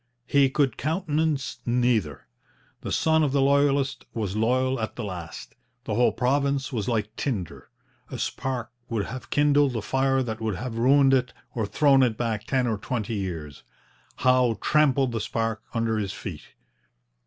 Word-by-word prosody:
He 140 -1 +4
could 135 -3 +1
countenance 155 -2 -1
neither. 120 - 0 0.6
The - - -5
son 160 0 +3
of 145 -3 +1
the 140 - +3
Loyalist 140 -1 +2
was 105 -4 -2
loyal 130 +4 +1
at 110 - -4
the 120 - -5
last. 90 -5 -7 0.3
The 110 - -3
whole 120 +3 +3
province 140 +2 0
was 105 -5 -2
like 110 -2 -1
tinder. 105 - -4 0.4
A - - -6
spark 125 -3 -3 0.2
would 110 -4 -1
have 130 +2 -8
kindled 145 -2 +3
a 115 - -1
fire 135 +2 +1
that 110 -2 -5
would 110 -3 -1
have 115 +2 -5
ruined 135 +2 +5
it, 125 -2 +1 0.2
or 110 -4 -2
thrown 140 +2 +4
it 120 -4 +2
back 110 -3 -2
ten 130 -2 +1
or 110 -3 -1
twenty 110 0 -3
years. 85 -8 -5 0.5
Howe 125 -3 +3
trampled 140 -4 +2
the 115 -2 -2
spark 115 +1 -2
under 115 -1 0
his 100 -2 -3
feet. 95 -6 -8
125 Hz, 165 wpm, -25 LUFS, 110-135 Hz, 0.6 s, ruined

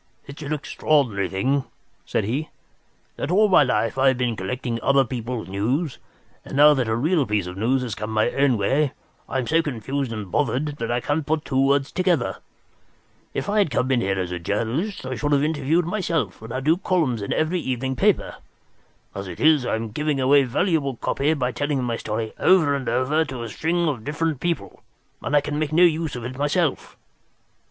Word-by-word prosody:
"It's 140 +2 -10
an 145 0 -5
extraordinary 140 -8 0
thing," 130 +9 0 0.4
said - - 0
he, 135 +10 -2 0.7
"that - - -3
all 210 +4 +4
my 185 - +6
life 125 -2 +1
I 135 - +4
have 130 -1 +3
been 125 -2 0
collecting 115 +4 -3
other 140 +1 +3
people's 120 -1 -4
news, 125 - -1 0.4
and - - -6
now 150 +1 +8
that 130 -5 0
a 110 - +1
real 155 +6 +2
piece 105 -3 0
of 90 0 -7
news 125 +6 +1
has 120 -4 -4
come 105 +2 -5
my 110 +2 +1
own 140 -3 +2
way 135 +8 +1 0.4
I - - -1
am 130 - -1
so 160 +6 +3
confused 135 -2 -3
and 105 -5 -6
bothered 145 +1 0
that 115 - -3
I 120 +1 0
can't 150 +4 -1
put 155 +1 -1
two 135 0 +1
words 140 0 +1
together. 180 -9 0 1.0
If - - -2
I 210 +1 +1
had 200 - +3
come 130 0 0
in 125 -2 +2
here 95 -2 0
as 90 -1 -3
a 90 - -3
journalist, 115 - -2
I 130 - -3
should 145 +3 -1
have 140 0 +3
interviewed 160 +2 +1
myself 165 - -2
and 110 +1 -9
had 130 +3 -4
two 160 +3 +4
columns 165 - 0
in 100 - -4
every 160 +3 +1
evening 130 -2 -2
paper. - - +1 0.8
As 100 0 -6
it 85 - -8
is, 150 -5 +4
I - - +1
am 110 -1 -4
giving 150 +3 -1
away 140 +2 +5
valuable 140 0 0
copy 145 +6 0
by 125 -3 -1
telling 145 -1 -1
my 120 -2 -1
story 110 +1 -4
over 175 -6 +4
and 135 -2 -2
over 135 +6 +1
to 130 -5 -6
a 115 - -5
string 170 +8 0
of 130 -8 -2
different 150 +1 -2
people, 170 - -3 0.4
and 145 - -1
I 145 - +5
can 145 +1 -3
make 155 -1 -1
no 170 +3 +5
use 160 -4 +2
of 120 -1 -6
it 130 +2 -6
myself. 145 +1 0
135 Hz, 210 wpm, -23 LUFS, 115-155 Hz, 1.0 s, now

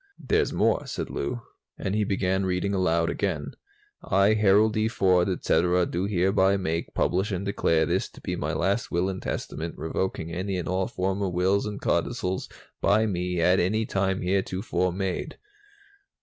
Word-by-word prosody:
"There's - - +1
more," - - +1
said - - -4
Lou, 120 -1 -3 0.3
and 95 - -3
he 105 0 +2
began 95 -1 0
reading 95 +2 0
aloud 85 -3 +1
again: 75 -8 -2 0.5
"'I, 100 +3 +3
Harold 105 +1 +4
D. 110 0 +1
Ford, 95 -4 +2
etc., 90 0 +2
do 90 +3 -2
hereby 95 0 +2
make, 85 -3 -3
publish 95 +4 +1
and 95 +1 -2
declare 85 -5 +2
this - - -1
to - - -15
be - - -3
my 75 - -2
last 95 +8 0
Will 90 +2 0
and 95 -1 -5
Testament, 80 +1 -4
revoking 80 +1 -3
any 95 +2 -2
and 90 - -4
all 95 +1 0
former 95 +1 -1
wills 95 +4 +1
and 105 -1 -5
codicils 95 +1 -1 0.3
by 110 +2 +3
me 90 -3 -1
at 90 +3 +4
any 110 +5 +1
time 95 -2 -1
heretofore 95 0 0
made.'" 95 0 -3
95 Hz, 165 wpm, -26 LUFS, 90-100 Hz, 0.5 s, Harold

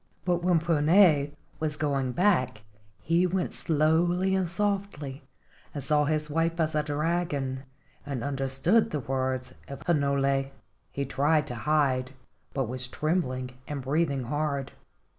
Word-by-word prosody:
But 175 -1 +1
when 180 -1 +3
Puna 160 -1 +4 0.3
was 155 -1 -2
going 135 -4 0
back 130 - +2 0.4
he 170 +3 +3
went 180 0 -1
slowly 170 +4 +2
and 190 -3 +1
softly, 195 -7 -2 0.5
and 140 - -4
saw 150 -1 +2
his 155 0 0
wife 165 +2 0
as 160 -1 +1
a 155 - +2
dragon, 145 -3 -1 0.4
and 135 -5 -4
understood 135 +9 +2
the 150 - -2
words 130 0 -2
of 140 -1 -8
Hinole. 140 -3 +2 0.4
He 140 - -2
tried 150 +3 +2
to 125 - -5
hide, 135 -4 +2 0.4
but 135 -3 -1
was 125 +1 -1
trembling 130 -4 -1 0.2
and 145 -3 -4
breathing 140 -1 0
hard. 140 +1 -2
150 Hz, 135 wpm, -28 LUFS, 135-165 Hz, 0.5 s, Puna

